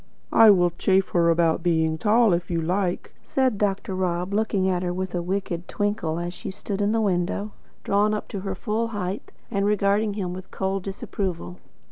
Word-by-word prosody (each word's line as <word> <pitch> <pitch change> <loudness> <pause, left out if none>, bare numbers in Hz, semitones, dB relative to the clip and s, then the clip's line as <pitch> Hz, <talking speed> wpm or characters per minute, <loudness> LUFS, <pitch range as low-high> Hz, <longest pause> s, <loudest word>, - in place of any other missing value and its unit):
"I 225 -1 +8
will 175 -3 +5
chaff 190 0 +3
her 170 -1 +3
about 165 0 +2
being 160 -2 +1
tall 220 0 +4
if 170 +1 -1
you 170 -1 0
like," 180 +2 -1
said 260 -6 0
Dr. 195 -1 -1
Rob, 180 0 -1
looking 205 -3 +1
at 180 -2 +1
her 180 -1 -1
with 185 0 -4
a 175 - -1
wicked 180 -1 -3
twinkle, 205 -6 -1
as 175 +1 -3
she - - -7
stood 200 +1 -4
in 205 +1 +2
the 225 - +1
window, 195 +1 0 0.3
drawn 205 +1 +2
up 210 - -5
to 200 - -4
her 190 0 -4
full 220 +4 -1
height, 205 -3 -4 0.2
and 200 -3 0
regarding 205 0 +2
him 185 -4 -3
with 185 +1 -8
cold 190 0 -2
disapproval. 180 - -4
190 Hz, 190 wpm, -24 LUFS, 175-205 Hz, 0.3 s, I